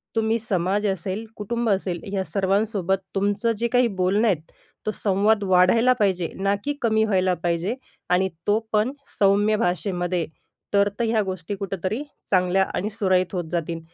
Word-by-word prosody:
तुम्ही 225 0 +2
समाज 205 -1 0
असेल, 195 +3 -3
कुटुंब 235 +2 -2
असेल, 190 -3 0
या 190 -1 0
सर्वांसोबत 195 -1 0 0.2
तुमचं 205 +4 +1
जे 235 - 0
काही 245 -1 +5
बोलणं 200 +5 +3
आहेत, 165 -6 -1 0.3
तो 215 - 0
संवाद 205 +2 +2
वाढायला 190 +7 +5
पाहिजे, 185 -4 +1
ना 195 +1 +1
की 290 - -1
कमी 220 -2 +3
व्हायला 185 -3 +2
पाहिजे 175 +6 0 0.3
आणि 185 +1 +3 0.2
तो 210 +2 +4
पण 215 +4 +2 0.3
सौम्य 205 +2 +4
भाषेमध्ये. 175 -2 -1 0.5
तर 200 0 +4
त - - +1
ह्या 225 -1 +2
गोष्टी 185 0 -4
कुठेतरी 195 - -3 0.3
चांगल्या 185 0 +3
आणि 205 - -1
सुरळीत 185 -3 +1
होत 180 - -1
जातील. 170 -1 -2
195 Hz, 155 wpm, -24 LUFS, 185-215 Hz, 0.5 s, काही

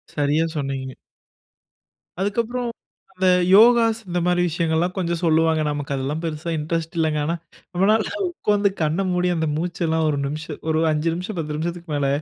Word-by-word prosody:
சரியா 150 +2 +2
சொன்னீங்க. 135 -2 -3 1.3
அதுக்கப்புறம் 235 +4 -1 0.4
அந்த 185 0 0 0.3
யோகாஸ், 230 +1 +6
இந்த 175 0 0
மாரி 180 0 +2
விஷயங்கள்லாம் 165 +2 0
கொஞ்சம் 170 -2 -1
சொல்லுவாங்க. 160 -1 +3
நமக்கு 145 -1 -3
அதெல்லாம் 140 +4 -3
பெருசா 160 +1 -4
இன்ட்ரெஸ்ட் 165 +2 -3
இல்லங்க. 155 -2 +1
ஆனா 165 +3 0 0.4
நம்மளால 205 +4 +2 0.2
உக்கார்ந்து 210 - +1
கண்ண 155 +4 +1
மூடி, 180 0 +1
அந்த 160 -1 0
மூச்சு 170 +2 -3
எல்லாம் 160 0 +1
1 145 - 0
நிமிஷம், 155 +3 -5
1 160 0 +2
5 155 +2 0
நிமிஷம், 180 +4 -5
பத்து 150 -2 -3
நிமிஷத்துக்கு 170 +1 -4
மேல 140 -1 +1
165 Hz, 150 wpm, -22 LUFS, 155-180 Hz, 1.3 s, யோகாஸ்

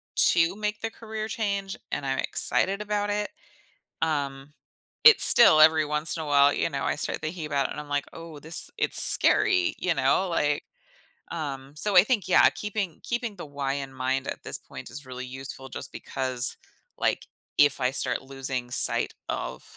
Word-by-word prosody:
to 170 +2 +3
make 210 0 -4
the 225 - -4
career 220 -1 -6
change, 200 -3 -3 0.2
and 145 - -3
I'm 135 0 -2
excited 195 +1 0
about 205 0 -2
it, 205 0 -2 0.7
um, 145 -3 -3 0.5
it's 455 -1 +8
still 195 -10 +8
every 160 0 +6
once 150 +1 +1
in 160 - -4
a - - -7
while, 145 -1 +4
you - - -1
know, - - -4
I - - 0
start - - -3
thinking 160 +1 -5
about 140 -2 -1
it, - - -11
and - - -6
I'm 150 - -13
like, 145 0 -1
"Oh, 165 -2 -10
this 160 +3 -2
it's 440 - +2
scary." 365 -3 +3
You 180 - 0
know? 140 +6 +1
Like, 150 -3 0 0.7
um, 140 -4 -6
so 200 +6 +1
I 180 - +9
think, 215 -5 -1
yeah, 185 - +5
keeping 205 -4 -5
keeping 235 -3 -3
the 175 - -8
why 140 -2 -3
in 135 -1 -6
mind 130 +1 -2
at - - -6
this - - -2
point, - - -11
is 140 +3 -9
really 130 0 -7
useful 135 +1 -9
just - - -7
because, 130 -1 0 0.4
like, - - -1 0.3
if 145 -1 +4
I 125 0 +1
start 135 - +1
losing 135 -2 -5
sight - - +1 0.2
of - - -5
150 Hz, 185 wpm, -26 LUFS, 135-200 Hz, 0.7 s, I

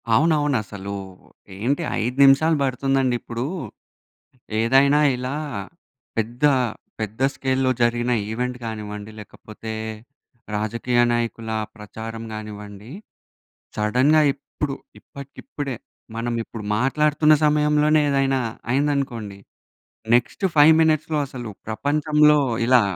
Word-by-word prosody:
అవునవును. 145 0 +3
అసలు 100 -1 -7 0.7
ఏంటి 140 +10 0 0.2
5 125 +4 -2
నిమిషాలు 140 +4 +5
పడుతుందండి, 135 -1 +1
ఇప్పుడు 120 +1 -4 1.2
ఏదైనా 135 +5 +4 0.2
ఇలా 130 +3 -4 0.8
పెద్ద, 115 +3 -3 0.6
పెద్ద 110 +2 -5
స్కేల్‌లో 130 -1 0
జరిగిన 120 +1 +1 0.2
ఈవెంట్ 125 +2 -2
కానివ్వండి, 105 -1 -6
లేకపోతే 110 +1 -9 0.8
రాజకీయ 115 +3 0
నాయకుల 115 -1 -2 0.3
ప్రచారం 110 +1 -8
కానివ్వండి 105 0 -9 0.9
సడెన్‌గా 130 +9 +3
ఇప్పుడు, 140 0 -5 0.3
ఇప్పటికిప్పుడే 140 - -7 0.4
మనం 120 +1 -2
ఇప్పుడు 110 -2 -9
మాట్లాడుతున్న 150 +4 +3
సమయంలోనే 150 0 +3
ఏదైనా 135 -1 +1 0.3
అయిందనుకోండి 130 -7 -1 0.8
నెక్స్ట్ 125 +10 0
5 150 +1 +8
మినిట్స్‌లో 155 -1 +2
అసలు 125 -4 -7 0.2
ప్రపంచంలో 150 +5 +3 0.3
ఇలా 125 0 +6
125 Hz, 90 wpm, -22 LUFS, 115-145 Hz, 1.2 s, 5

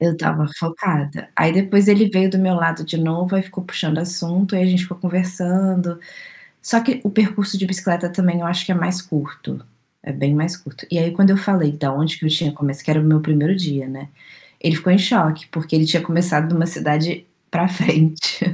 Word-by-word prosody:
Eu 170 +1 +2
estava 160 -2 -1
focada. 165 -3 -3
Aí 160 - +3
depois 195 +2 +3
ele 210 +1 +6
veio 190 -1 +2
do 190 - 0
meu 185 -1 +2
lado 165 -2 0
de 165 +1 -5
novo, 165 +3 -1
aí 190 - +2
ficou 185 0 -9
puxando 160 -4 -2
assunto 180 +3 -1
e 185 - +1
a - - +4
gente 180 0 +2
ficou 180 -1 -9
conversando. 185 0 -1 0.6
Só 230 - +2
que 255 +2 -1
o 205 - 0
percurso 205 -1 +1
de 195 - -1
bicicleta 185 -2 -1
também 175 -1 0
eu 170 - -4
acho 175 +1 -1
que 190 - -2
é - - +1
mais 180 +1 0
curto, 155 -8 -6 0.4
é 145 - -6
bem 140 +1 -1
mais 165 +4 0
curto, 145 -7 -14
e 175 - 0
aí 165 +1 0
quando 195 +3 +4
eu 195 - +4
falei 190 -6 +1
da 145 -2 -3
onde 155 +3 -1
que 160 - -4
eu - - +2
tinha 155 -1 +1
começado 145 -1 -4
que 155 - 0
era 155 - +3
o - - +1
meu 155 0 +5
1º 155 +3 +1
dia, 145 -8 -3
né, 135 +2 -10 0.5
ele 165 -1 +1
ficou 165 +3 0
em - - +8
choque 165 -6 +1
porque 160 -1 -4
ele 155 0 +4
tinha 165 +1 +2
começado 170 -2 +1
em - - +2
uma 165 0 +2
cidade 165 +1 -1 0.2
pra 170 +1 +1
frente. 160 -3 +1
175 Hz, 225 wpm, -19 LUFS, 155-185 Hz, 0.6 s, em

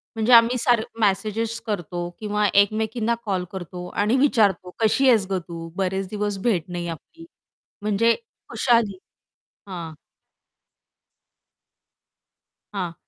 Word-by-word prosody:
म्हणजे 225 +2 +2
आम्ही 235 +2 +7
सार 240 -2 +3 0.2
मॅसेजेस 220 +3 0
करतो 175 -4 -3
किंवा 210 -1 0
एकमेकींना 220 +3 +2
कॉल 190 -3 -1
करतो 180 -1 -7
आणि 210 +4 0
विचारतो 205 -10 +2
"कशी 225 +5 +3
आहेस 220 -5 +4
गं 190 -1 0
तू? 165 -1 -7
बरेच 190 0 -1
दिवस 205 -1 -2
भेट 180 -8 +2
नाही 175 -1 -4
आपली" 320 - -9 0.6
म्हणजे 215 +3 +2 0.3
खुशाली 230 -6 +2 0.7
हां. 170 -4 -6 2.8
हां. 180 -4 -3
205 Hz, 110 wpm, -23 LUFS, 185-225 Hz, 2.8 s, आम्ही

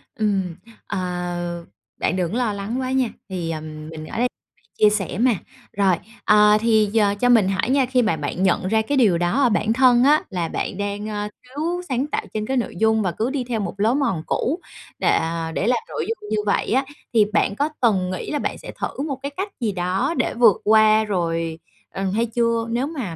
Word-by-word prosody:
Ừm, 195 -5 0 0.3
à, 180 -1 -3 0.6
bạn 175 - 0
đừng 175 -2 -1
có 235 - -2
lo 235 -4 0
lắng 205 +5 -3
quá 255 0 -2
nha, 260 -3 +1 0.2
thì, 175 -3 -3
ờ, 155 -1 -3
mình 155 0 -8
ở - - -7
đây 245 +2 +2 0.5
chia 210 - +7
sẻ 205 -3 -2
mà. 250 +1 +4 0.5
Rồi, 195 -3 +4 0.3
ờ, 210 0 +6
thì 220 -2 +3
giờ 205 -2 +3
cho 245 - +3
mình 220 -6 +5
hỏi 195 +5 0
nha, 270 0 +3
khi 250 0 +2
mà 210 -8 +1
bạn 150 +5 -3
nhận 185 0 +2
ra 220 +3 +2
cái 275 +6 -1
điều 205 -9 +4
đó 175 +11 +1
ở 250 - +5
bản 215 0 +1
thân 250 -1 +5
á 295 +3 +5
là 175 -4 -2
bạn 185 - -3
đang, 205 +1 -3
a, 210 0 -3
thiếu 315 +8 -3
sáng 260 +2 0
tạo - - -2
trên 215 0 -2
cái 265 - 0
nội 235 - -2
dung 220 0 +3
và 180 -3 0
cứ 225 +9 -2
đi 270 -2 -2
theo 240 -2 -3
một 200 -1 -4
lối 225 +5 +3
mòn 235 - 0
cũ 310 +8 -1 0.4
đệ, - - 0
à, 165 0 0
để 195 - -1
làm 250 - +3
nội - - -3
dung 435 - -5
như 215 - 0
vậy 200 - 0
á, 265 +2 +2 0.3
thì 215 -3 +5
bạn 200 - +2
có 290 +7 0
từng 195 -7 +2
nghĩ 185 - -5
là 295 - -1
bạn - - -3
sẽ - - -9
thử - - -3
một 275 -3 -3
cái 280 - -2
cách 390 +2 -2
gì 230 -4 0
đó 185 - -1
để - - 0
vượt 230 -4 +4
qua 215 0 +5
rồi, 165 -5 -2 0.3
ờ, 195 - -4
hay 230 +3 +1
chưa? 230 0 0
Nếu 240 +4 0
mà, 255 - -5
215 Hz, 230 wpm, -22 LUFS, 185-245 Hz, 0.6 s, chia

